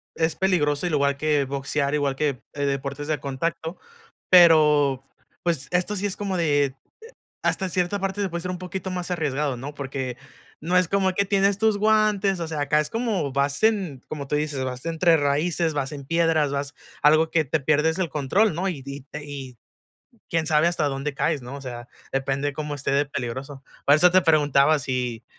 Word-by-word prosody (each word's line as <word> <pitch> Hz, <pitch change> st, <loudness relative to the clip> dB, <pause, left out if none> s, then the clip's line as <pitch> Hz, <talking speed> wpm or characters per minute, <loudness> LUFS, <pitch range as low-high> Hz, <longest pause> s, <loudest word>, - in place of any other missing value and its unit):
es 160 Hz, 0 st, 0 dB
peligroso 160 Hz, -5 st, +1 dB
al 175 Hz, -, -1 dB
igual 140 Hz, -2 st, +2 dB
que 150 Hz, -1 st, +1 dB
boxear 140 Hz, +1 st, -2 dB
igual 140 Hz, -2 st, 0 dB
que, 140 Hz, -4 st, -1 dB
eh, 145 Hz, -1 st, -2 dB
deportes 140 Hz, +1 st, -3 dB
de 155 Hz, -2 st, -1 dB
contacto, 160 Hz, +5 st, -3 dB, 0.5 s
pero, 150 Hz, -6 st, +6 dB, 0.4 s
pues, 165 Hz, -6 st, 0 dB
esto 180 Hz, +3 st, +1 dB
sí 200 Hz, +1 st, -1 dB
es 200 Hz, -, -1 dB
como 200 Hz, -2 st, -3 dB
de 145 Hz, -5 st, +1 dB, 0.7 s
hasta 190 Hz, -, 0 dB
cierta 180 Hz, +2 st, -1 dB
parte 195 Hz, +1 st, -1 dB
puede 170 Hz, -1 st, -4 dB
ser 180 Hz, -, -4 dB
un 180 Hz, -, -5 dB
poquito 185 Hz, +1 st, -5 dB
más 180 Hz, 0 st, -4 dB
arriesgado, 150 Hz, -5 st, -1 dB
¿no?, 140 Hz, +4 st, -7 dB
porque 135 Hz, -3 st, -4 dB, 0.4 s
no 175 Hz, +4 st, 0 dB
es 180 Hz, -, +3 dB
como 190 Hz, 0 st, +1 dB
que 200 Hz, +2 st, +2 dB
tienes 200 Hz, 0 st, +2 dB
tus 220 Hz, -1 st, +2 dB
guantes, 210 Hz, -2 st, +2 dB
o 165 Hz, -, -2 dB
sea, 155 Hz, -2 st, -3 dB
acá 145 Hz, +1 st, +2 dB
es 150 Hz, -, -3 dB
como 220 Hz, -, -1 dB
vas 140 Hz, +4 st, 0 dB
en, 190 Hz, -, +1 dB
como 140 Hz, -3 st, -6 dB
tú 150 Hz, -, 0 dB
dices, 150 Hz, -3 st, -2 dB
vas 130 Hz, +4 st, -5 dB
entre 165 Hz, 0 st, +3 dB
raíces, 155 Hz, +3 st, 0 dB
vas 135 Hz, -2 st, -2 dB
en 140 Hz, -2 st, -7 dB
piedras, 165 Hz, -1 st, +1 dB
vas 140 Hz, 0 st, -3 dB, 0.3 s
algo 155 Hz, +2 st, +5 dB
que 160 Hz, -1 st, +2 dB
te 155 Hz, +3 st, 0 dB
pierdes 155 Hz, +4 st, +1 dB
el 185 Hz, -, 0 dB
control, 160 Hz, +8 st, +1 dB
¿no?, 185 Hz, +4 st, -1 dB
y 155 Hz, -8 st, -4 dB
y 140 Hz, -1 st, -7 dB
y 140 Hz, -4 st, -8 dB, 0.7 s
quién 165 Hz, -1 st, 0 dB
sabe 155 Hz, +1 st, +3 dB
hasta 170 Hz, -3 st, -1 dB
dónde 140 Hz, +1 st, -3 dB
caes, 145 Hz, 0 st, 0 dB
¿no?, 125 Hz, +3 st, -7 dB
o -, -, -8 dB
sea, 120 Hz, -2 st, -8 dB, 0.2 s
depende 135 Hz, +1 st, -1 dB
de -, -, -4 dB
cómo 150 Hz, 0 st, -4 dB
esté 135 Hz, 0 st, -2 dB
de 140 Hz, +1 st, +3 dB
peligroso, 135 Hz, +1 st, -6 dB, 0.2 s
por 145 Hz, -, +7 dB
eso 180 Hz, +3 st, +5 dB
te 185 Hz, -, +6 dB
preguntaba 155 Hz, -2 st, +4 dB
si, 125 Hz, -4 st, -3 dB
150 Hz, 195 wpm, -24 LUFS, 140-175 Hz, 0.7 s, por